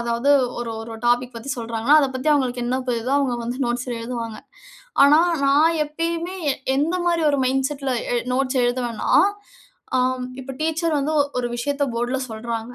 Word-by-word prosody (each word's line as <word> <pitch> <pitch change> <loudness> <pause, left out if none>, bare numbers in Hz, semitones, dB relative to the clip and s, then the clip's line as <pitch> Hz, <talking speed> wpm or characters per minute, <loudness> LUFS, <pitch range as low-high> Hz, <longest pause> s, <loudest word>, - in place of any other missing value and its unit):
அதாவது 235 +3 0 0.3
ஒரு 240 -1 -4
ஒரு 225 0 -8 0.2
டாபிக் 245 +1 +1
பத்தி 230 +4 -8
சொல்றாங்கன்னா 230 +4 +2
அதப் 270 -2 0
பத்தி 260 +4 -2
அவங்களுக்கு 250 -3 0
என்ன 255 +2 0
தெரியுதோ, 235 +1 -2
அவங்க 265 -4 0
வந்து 245 +2 -3
நோட்ஸ்ல 245 +1 -2
எழுதுவாங்க. 230 -2 -5 0.7
ஆனா 290 +2 +7 0.3
நான் 305 +4 +4
எப்பயுமே 335 +4 -3 0.2
எ - - -3 0.2
எந்த 300 +6 +1
மாதிரி 340 -1 +1
ஒரு 285 - +1
மைண்ட்செட்டில 270 +1 -1 0.2
எ - - +2 0.2
நோட்ஸ் 265 +1 0
எழுதுவேனா, 245 -2 -1 0.9
ஆ 255 - +3 0.4
இப்போ 270 +1 -7
டீச்சர் 320 0 0
வந்து 300 +3 -1 0.2
ஒரு 245 - -1
விஷயத்தை 285 +3 -1
போர்ட்ல 240 +3 -1
சொல்றாங்க. 230 +1 -5
255 Hz, 160 wpm, -22 LUFS, 240-285 Hz, 0.9 s, ஆனா